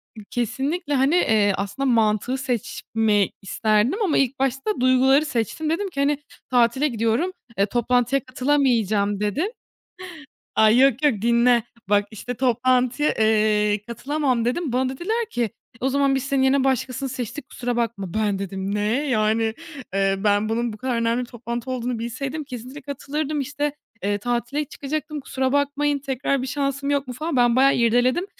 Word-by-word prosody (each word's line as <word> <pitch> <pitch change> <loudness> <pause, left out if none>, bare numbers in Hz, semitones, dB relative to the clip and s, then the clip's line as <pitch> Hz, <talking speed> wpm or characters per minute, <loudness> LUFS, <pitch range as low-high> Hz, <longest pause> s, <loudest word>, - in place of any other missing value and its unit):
I 215 -2 -11
kesinlikle. 285 - -2
Hani, 270 +6 +3
eee, 210 - +3
aslında 200 +8 -3
mantığı 230 +1 +2
seçmeyi 225 -4 0
isterdim 215 - +1
ama 350 - +2
ilk 265 0 +1
başta 270 - -1
duyguları 265 +3 +4
seçtim. 265 +5 -2
Dedim 385 +4 -1
ki, 280 - -7
"Hani, 285 0 +2 0.3
tatile 255 +4 +3
gidiyorum, 230 - 0 0.3
eee, 200 - +3
toplantıya 245 +4 +1
katılamayacağım." 235 -7 +1
dedim. 235 - 0 1.1
Ay, 220 +3 +5
yok, 270 +1 +4
yok. 230 -9 +2
Dinle, 235 0 +4 0.3
bak, 205 0 +3
işte, 245 +3 -6
"Toplantıya, 255 +3 +2
eee, 210 -1 +2
katılamam." 255 0 -1
dedim. 275 +2 -1
Bana 255 +1 +1
dediler 435 - -2
ki, 235 - -1 0.3
"O 265 - +1
zaman 275 0 +2
biz 265 - -1
senin 275 -1 0
yerine 265 0 +3
başkasını 265 0 -1
seçtik, 250 +3 -6
kusura 245 -1 -3
bakma." 215 -7 -2
Ben 210 -3 0
dedim, 195 +1 -3
"Ne? 230 +8 0
Yani, 220 -1 +1 0.4
eee, 195 0 +2
ben 205 +1 +1
bunun 230 0 -1
bu - - -9
kadar 255 0 -2
önemli 230 +2 0
toplantı 240 +1 -5
olduğunu 245 -2 -2
bilseydim 270 +6 -4
kesinlikle 255 +1 -8
katılırdım. 290 +1 -3
İşte, 290 +2 -2 0.3
eee, 205 +1 +1
tatile 245 +6 -2
çıkacaktım. 300 +2 -4
Kusura 265 -1 -2
bakmayın, 285 0 +1
tekrar 275 0 -1
bir 260 - -4
şansım 280 0 -2
yok 280 -2 0
mu?" 250 - -5
falan. 310 +3 -3
Ben 240 -1 +4
bayağı 270 +1 +5
irdeledim. 245 - +2
250 Hz, 155 wpm, -23 LUFS, 225-275 Hz, 1.1 s, Ay